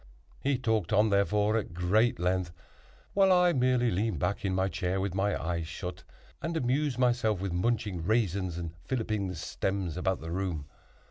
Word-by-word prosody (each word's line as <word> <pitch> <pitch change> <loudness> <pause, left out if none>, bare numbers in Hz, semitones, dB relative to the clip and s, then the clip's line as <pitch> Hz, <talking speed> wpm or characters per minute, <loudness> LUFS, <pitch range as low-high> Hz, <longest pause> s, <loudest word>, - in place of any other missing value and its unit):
He 140 -1 +1
talked 110 -7 0
on, 105 +1 +4
therefore, 105 +2 +2
at 100 -6 -4
great 105 +7 +2
length, 90 0 0 0.6
while 195 -1 +5
I 180 -1 +5
merely 125 -3 +2
leaned 105 0 0
back 100 +8 -1
in 95 -2 0
my 95 0 +2
chair 90 +1 -1
with 95 -1 -2
my 100 +2 0
eyes 85 -1 -2
shut, 90 +2 -6 0.4
and 165 0 -2
amused 135 0 0
myself 120 -5 +2
with 95 -2 -3
munching 100 -2 0
raisins 95 -4 0
and 85 -2 -5
filliping 110 -5 -1
the 90 - -5
stems 95 +1 -2
about 95 0 0
the 80 +1 -6
room. 90 -5 -2
100 Hz, 175 wpm, -29 LUFS, 90-120 Hz, 0.6 s, while